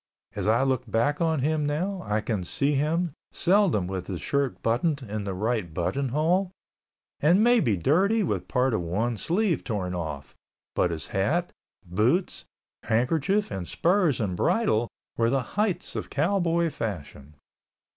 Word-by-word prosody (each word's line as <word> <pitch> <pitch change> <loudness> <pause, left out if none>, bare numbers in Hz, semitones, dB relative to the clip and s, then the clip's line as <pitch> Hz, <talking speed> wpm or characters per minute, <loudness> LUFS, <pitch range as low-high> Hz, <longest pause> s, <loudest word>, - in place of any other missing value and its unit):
As 100 -1 -2
I 115 +4 +4
look 130 -3 0
back 120 +8 +1
on 160 -4 +1
him 150 +1 +1
now, 180 +6 -2
I 105 0 0
can 105 -4 -2
see 140 +10 0
him, 155 +3 0 0.2
seldom 180 - +2
with 95 0 -4
his 90 -4 -4
shirt 140 -2 -1
buttoned 140 +5 +1
in 105 -2 -4
the 95 -2 -3
right 105 -3 -1
button 130 - -1
hole, 170 +8 +1 0.7
and 175 +8 +4
maybe 230 - +4
dirty 195 - +3
with 175 - -2
part 125 0 +1
of 110 - 0
one 105 +8 -1
sleeve 175 - 0
torn 95 -6 -3
off, 80 -5 -5 0.4
but 90 - +2
his 80 -4 -4
hat, 160 - 0 0.3
boots, 110 - 0 0.4
handkerchief 155 - +1
and 90 -3 -4
spurs 175 -5 +2
and 100 -5 -1
bridle 120 - +2 0.3
were 115 0 +3
the 135 0 +1
heights 210 -3 -1
of - - -4
cowboy 170 +1 +1
fashion. 80 - -6
130 Hz, 155 wpm, -26 LUFS, 105-170 Hz, 0.7 s, I